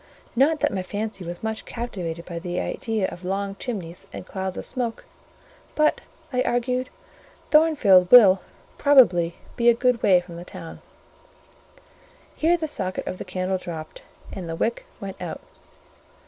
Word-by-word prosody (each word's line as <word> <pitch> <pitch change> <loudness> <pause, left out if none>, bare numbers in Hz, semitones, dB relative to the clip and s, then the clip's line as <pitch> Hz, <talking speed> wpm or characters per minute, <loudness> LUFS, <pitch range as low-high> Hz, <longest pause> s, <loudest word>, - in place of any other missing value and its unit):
Not 295 +5 +3
that 295 - +2
my 190 - -1
fancy 205 +1 -5
was 175 +3 -7
much 220 0 -3
captivated 175 -8 -5
by 170 -2 -5
the 175 +1 -3
idea 220 -4 -1
of 175 - -10
long 195 +2 -2
chimneys 190 -5 -6
and - - -8
clouds 190 -1 -4
of - - -4
smoke—"but," 285 - -3 0.3
I 250 - +2
argued, 250 +1 0 0.6
"Thornfield 260 - +5
will, 195 -6 +8 0.4
probably, 185 - +5 0.2
be 240 -1 +4
a 235 - +5
good 245 -1 +1
way 185 -2 +5
from 175 -1 -10
the 170 - -7
town." 175 -2 -10 1.5
Here 335 +3 +3
the 320 -2 -3
socket 185 -10 -3
of 185 - -5
the - - -6
candle 185 0 -2
dropped, 160 -3 -7 0.3
and 180 -3 -6
the 165 - -3
wick 230 +7 -2
went 195 -2 -7
out. 175 -3 -5
195 Hz, 150 wpm, -24 LUFS, 180-245 Hz, 1.5 s, will